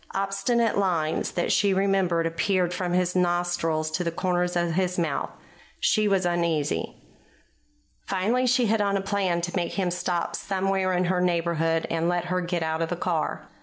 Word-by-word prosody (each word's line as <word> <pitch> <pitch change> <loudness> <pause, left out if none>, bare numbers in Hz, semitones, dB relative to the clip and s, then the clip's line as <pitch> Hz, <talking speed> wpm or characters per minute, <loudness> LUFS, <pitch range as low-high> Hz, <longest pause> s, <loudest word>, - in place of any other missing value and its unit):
Obstinate 200 +4 +1
lines 165 -5 0
that 175 - 0
she 200 -2 +3
remembered 190 -4 +1
appeared 180 +2 0
from 180 -1 -2
his 180 0 +1
nostrils 175 -3 0
to 180 +3 -1
the 170 - 0
corners 180 +1 -1
of 175 -1 +1
his 180 +1 0
mouth. 165 -5 -1 0.5
She 215 -1 +2
was 195 -2 +2
uneasy. 170 -4 0 1.1
Finally 225 +7 +1
she 250 0 +3
hit 220 0 +2
on 200 -1 +1
a - - -1
plan 195 -3 0
to 175 +2 -4
make 175 -2 -1
him 185 -3 0
stop 175 -1 -2
somewhere 195 -1 0
in 180 0 +1
her 180 0 +1
neighborhood 165 -2 +1
and 165 +1 0
let 175 0 0
her 180 - +1
get 175 -1 -2
out 160 0 -1
of 165 - -1
the 175 - -1
car. 170 -2 -2
180 Hz, 175 wpm, -25 LUFS, 170-195 Hz, 1.1 s, she